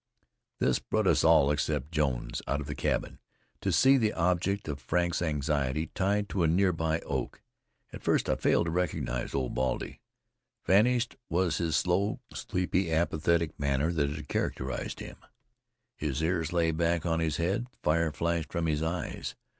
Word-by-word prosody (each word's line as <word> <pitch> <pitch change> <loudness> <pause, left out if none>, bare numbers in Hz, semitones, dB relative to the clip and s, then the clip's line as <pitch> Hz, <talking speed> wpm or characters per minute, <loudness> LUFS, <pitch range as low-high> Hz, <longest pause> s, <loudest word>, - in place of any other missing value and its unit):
This - - +2
brought - - -1
us - - +3
all, 70 +1 +5
except 75 0 -1
Jones, 65 -6 -1
out 70 +2 0
of 75 - -5
the 75 - -4
cabin, - - -2 0.4
to - - 0
see 135 +1 +5
the 110 -4 +1
object 90 +3 0
of 70 -2 -4
Frank's 85 0 0
anxiety 75 -1 -1
tied 100 +1 +1
to 95 - -1
a 85 - +4
nearby 80 -2 +1
oak. - - -4 0.5
At - - -8
first - - +1
I - - +2
failed - - +2
to 85 - -2
recognize 80 -8 -2
Old 65 -2 -1
Baldy. 65 0 -2 0.6
Vanished 120 +5 +3
was 85 -1 +1
the 85 -2 0
slow, 90 +5 +1
sleepy, 90 -1 -1
apathetic 80 0 +1
manner 70 +3 +1
that 75 -4 +1
had 75 0 -6
characterized 65 0 -3
him; - - -8 0.8
his 75 0 -2
ears 80 -1 0
lay 85 -2 +2
back 85 +1 0
on 80 -1 +1
his 80 -3 0
head; 95 +8 0 0.2
fire 80 +1 +2
flashed 85 +1 -1
from 85 -2 -1
his 75 -1 0
eyes. 80 +1 -3
80 Hz, 160 wpm, -29 LUFS, 75-90 Hz, 0.8 s, all